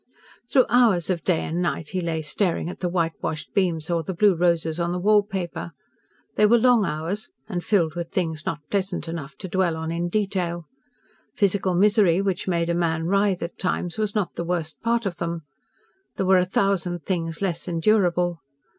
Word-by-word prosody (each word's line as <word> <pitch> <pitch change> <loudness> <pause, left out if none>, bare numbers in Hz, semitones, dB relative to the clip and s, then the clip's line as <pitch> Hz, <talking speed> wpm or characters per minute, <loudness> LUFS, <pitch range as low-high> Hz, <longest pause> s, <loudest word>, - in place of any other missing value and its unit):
Through 260 - +5
hours 220 -8 +3
of 170 -4 -2
day 175 -4 +1
and 170 +3 -2
night 170 -3 -2
he 185 - -2
lay 165 -2 -2
staring 170 +2 -1
at - - -11
the 180 - -1
whitewashed 165 -3 -2
beams 170 -5 0
or 170 -1 0
the 175 +3 -5
blue 205 +2 +5
roses 170 -1 +1
on 170 0 0
the 180 - -1
wall 205 +3 +4
paper. 185 -4 -5 0.6
They 210 - +6
were 235 +3 +5
long 235 -3 +4
hours, 165 +8 -3 0.2
and 180 -5 -3
filled 170 -7 +2
with 170 0 -4
things 160 -4 -2
not 150 -2 -4
pleasant 195 -4 -1
enough 160 -4 -6
to 190 - -6
dwell 180 -3 0
on 160 0 -3
in 170 +1 -2
detail. 180 -4 -1 0.7
Physical 195 -2 +1
misery 200 -2 +4
which 195 -2 -1
made 170 -2 +1
a - - +1
man 165 -2 0
writhe 195 0 +1
at 170 - -7
times 180 0 -2
was 215 -1 -1
not 205 -4 0
the - - -4
worst 170 -3 -3
part 235 0 +1
of 185 -3 -3
them. 170 -1 -3 0.7
There 190 - -1
were 190 0 +5
a 180 - +2
thousand 180 -3 0
things 165 -4 -2
less 175 -4 -2
endurable. 175 -1 +2
175 Hz, 190 wpm, -24 LUFS, 165-195 Hz, 0.7 s, They